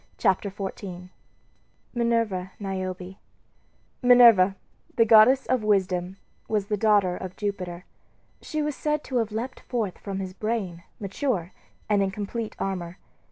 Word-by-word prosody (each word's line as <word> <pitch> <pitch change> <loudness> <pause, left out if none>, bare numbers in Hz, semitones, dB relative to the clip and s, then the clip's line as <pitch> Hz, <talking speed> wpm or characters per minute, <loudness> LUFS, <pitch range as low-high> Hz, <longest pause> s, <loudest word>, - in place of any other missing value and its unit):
CHAPTER 195 +2 +1
XIV 190 -2 -7 0.8
MINERVA 230 -6 0
NIOBE 190 -2 -3
MINERVA 190 +1 -9 0.8
Minerva, 235 -7 +7 0.4
the 230 - +5
goddess 230 +4 +6
of 255 -4 0
wisdom, 190 -3 +1 0.3
was 210 -3 0
the 210 - -1
daughter 205 -4 +3
of 185 0 -7
Jupiter. 185 -4 -4 0.6
She 310 -1 -3
was 295 -1 -2
said 300 0 -1
to 255 - -2
have 225 -2 0
leaped 240 +4 -4
forth 220 -7 -3
from 195 -2 -5
his 190 -1 -5
brain, 200 -5 -3 0.2
mature, 200 -2 -2 0.4
and 205 -2 +2
in 195 - +1
complete 210 +3 -5
armor. 180 -2 -4
200 Hz, 135 wpm, -26 LUFS, 185-230 Hz, 0.8 s, Minerva